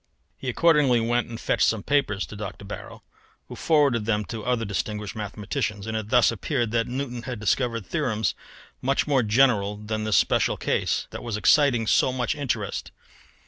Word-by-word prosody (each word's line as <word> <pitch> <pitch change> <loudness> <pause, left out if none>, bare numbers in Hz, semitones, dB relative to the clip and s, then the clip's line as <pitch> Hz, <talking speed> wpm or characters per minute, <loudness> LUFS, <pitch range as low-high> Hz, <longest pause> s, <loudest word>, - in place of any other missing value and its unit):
He 130 - -5
accordingly 145 -3 +4
went 120 +1 0
and 115 -1 -7
fetched - - +2
some 110 -3 0
papers 135 -9 +1
to - - -10
Dr. 100 -1 -7
Barrow, - - -9 0.4
who - - -8
forwarded 140 -9 +2
them 105 -1 0
to 110 0 -6
other 120 -2 0
distinguished 105 +1 -3
mathematicians, 105 -1 -3
and 110 0 -4
it 110 -1 -3
thus 125 0 +5
appeared 120 0 -2
that 115 0 +1
Newton 125 -1 -4
had 120 -1 -6
discovered 115 0 0
theorems 115 - -1 0.5
much 135 +1 +1
more 140 -3 +2
general 105 -3 +2
than 110 +1 -4
this 110 -1 +2
special - - +2
case - - 0
that - - -7
was 115 -3 -3
exciting 120 +1 +4
so 130 - +3
much 125 -1 -1
interest. 120 -8 -3
115 Hz, 175 wpm, -25 LUFS, 105-130 Hz, 0.5 s, thus